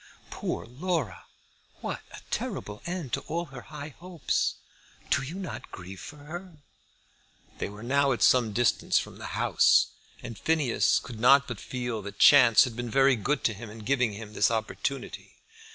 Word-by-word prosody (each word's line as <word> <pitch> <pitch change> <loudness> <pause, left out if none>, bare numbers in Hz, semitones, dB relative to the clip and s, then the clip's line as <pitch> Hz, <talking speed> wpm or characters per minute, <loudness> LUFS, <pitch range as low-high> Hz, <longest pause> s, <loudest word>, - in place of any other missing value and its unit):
Poor - - -4
Laura! 155 +4 -3 0.6
What - - -4
a - - -10
terrible 105 0 -4
end 175 -8 -4
to - - +1
all 170 +3 -2
her 125 - -7
high 150 0 -7
hopes! 175 -3 -1 0.6
Do - - +3
you 140 +6 -6
not 190 -1 -7
grieve 95 +1 -9
for 150 - -10
her?" 170 +4 -9 1.0
They - - -2
were 105 +2 -10
now 140 +3 +2
at 120 - 0
some 120 -4 +4
distance 120 +3 +2
from - - -3
the - - -6
house, - - +4 0.3
and 115 -4 -7
Phineas 150 -5 +2
could 115 -2 -6
not 140 +4 +6
but 120 -5 -5
feel 120 -3 -4
that 100 0 -8
chance 125 -6 +8
had 125 -3 -4
been 120 0 -4
very 135 +2 +4
good 135 +7 -1
to 115 - +2
him 105 +2 -9
in 110 0 -10
giving 125 -3 +1
him 105 0 -9
his - - +3
opportunity. 115 +4 -4
125 Hz, 170 wpm, -28 LUFS, 115-145 Hz, 1.0 s, chance